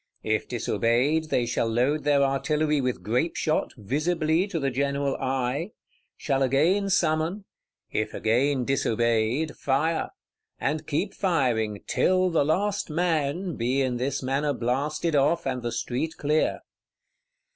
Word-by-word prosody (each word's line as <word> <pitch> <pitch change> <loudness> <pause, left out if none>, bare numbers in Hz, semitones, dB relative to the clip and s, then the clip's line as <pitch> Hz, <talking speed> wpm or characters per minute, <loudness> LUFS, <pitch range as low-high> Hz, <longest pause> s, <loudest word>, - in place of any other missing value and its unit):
If - - 0
disobeyed, 130 +8 +1
they 120 - +1
shall 120 -1 0
load 130 +6 +1
their 145 -1 +4
artillery 150 +2 +1
with 125 -1 -2
grape 125 +10 0
shot, 155 - 0
visibly 155 - 0
to 175 -5 -3
the 135 -2 0
general 140 +1 0
eye; 135 - -2 0.4
shall 135 -2 -1
again 160 +10 +2
summon; 170 +2 +1 0.5
if 110 - -2
again 125 +4 +1
disobeyed, 120 +2 +1
fire,—and 155 +1 -3
keep 185 +7 -1
firing 115 - 0
"till 185 0 +2
the 160 -3 +3
last 195 +7 0
man" 165 +1 0
be 130 +4 +1
in 125 -2 -1
this 135 +2 -2
manner 140 +3 0
blasted 145 +6 -1
off, 150 +4 +2
and 130 -2 -2
the 120 0 -3
street 135 +9 -3
clear. 150 +2 +1
140 Hz, 130 wpm, -26 LUFS, 125-160 Hz, 0.5 s, their